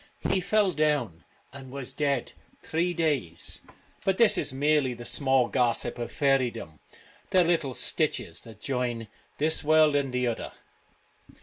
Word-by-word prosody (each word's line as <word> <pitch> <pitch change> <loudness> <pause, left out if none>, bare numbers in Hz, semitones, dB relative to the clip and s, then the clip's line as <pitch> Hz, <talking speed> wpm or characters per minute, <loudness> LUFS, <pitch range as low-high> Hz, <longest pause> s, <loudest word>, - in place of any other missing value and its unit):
' - - -37
He 190 - +1
fell 205 +1 +2
down, 145 - -1 0.3
and 135 -1 -10
was 135 -1 -5
dead 140 -4 -1 0.3
three 170 +3 0
days.' 145 - 0 0.4
But 190 -1 +1
this 230 -3 +5
is - - +1
merely 140 -1 +1
the 120 0 -10
small 130 -3 +2
gossip 120 -1 0
of 120 - -4
faerydom 125 - 0 0.2
— - - -27
the 185 -1 +4
little 165 -7 0
stitches - - -1
that 110 -3 -13
join 120 -4 -3 0.3
this 160 +2 +1
world 155 -1 +4
and 140 -2 0
the 125 0 0
other. 120 -2 -3
135 Hz, 150 wpm, -27 LUFS, 120-155 Hz, 0.4 s, this